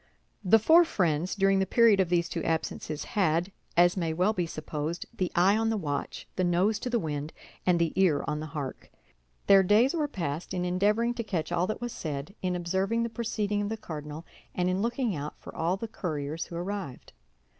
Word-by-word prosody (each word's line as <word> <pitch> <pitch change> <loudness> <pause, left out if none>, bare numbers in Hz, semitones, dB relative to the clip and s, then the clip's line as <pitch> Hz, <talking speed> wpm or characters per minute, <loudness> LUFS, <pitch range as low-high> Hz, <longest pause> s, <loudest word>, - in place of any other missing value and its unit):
The 200 +3 +6
four 320 +11 +6
friends, 175 - 0
during 195 -1 +3
the 190 - +1
period 230 -4 +5
of 185 -3 +2
these 170 -1 +2
two 165 -2 -4
absences, 160 -1 -2
had, 175 -1 0 0.3
as 175 0 +5
may 165 -4 -1
well 185 +6 +2
be 180 -4 -1
supposed, 155 +1 -4
the 185 -5 -1
eye 185 +4 +5
on 225 0 +1
the 225 - 0
watch, 145 -7 -4
the 185 - +2
nose 180 +5 +2
to 250 - -4
the 240 - +1
wind, 150 -5 -3 0.3
and 180 -1 +5
the 170 -1 +1
ear 185 -6 +3
on 150 - -2
the 155 - -5
hark. 145 -3 -6 0.6
Their 195 -1 +7
days 210 +7 +4
were 310 -3 0
passed 170 - -4
in 180 0 -1
endeavoring 210 +6 +2
to 235 - -4
catch 180 -7 -3
all 175 +1 +1
that 215 - -4
was 240 -1 -4
said, 150 +3 -5
in 180 -1 -1
observing 190 +6 0
the 235 - -2
proceeding 215 -3 -2
of 205 - -2
the 225 - -3
cardinal, 150 -3 -7 0.3
and 180 0 +1
in 185 +2 0
looking 235 -2 0
out 150 +1 -5
for - - -11
all 170 +4 0
the 230 - -5
couriers 160 -6 -4
who 170 - -9
arrived. 180 -6 -5
180 Hz, 210 wpm, -28 LUFS, 160-210 Hz, 0.6 s, Their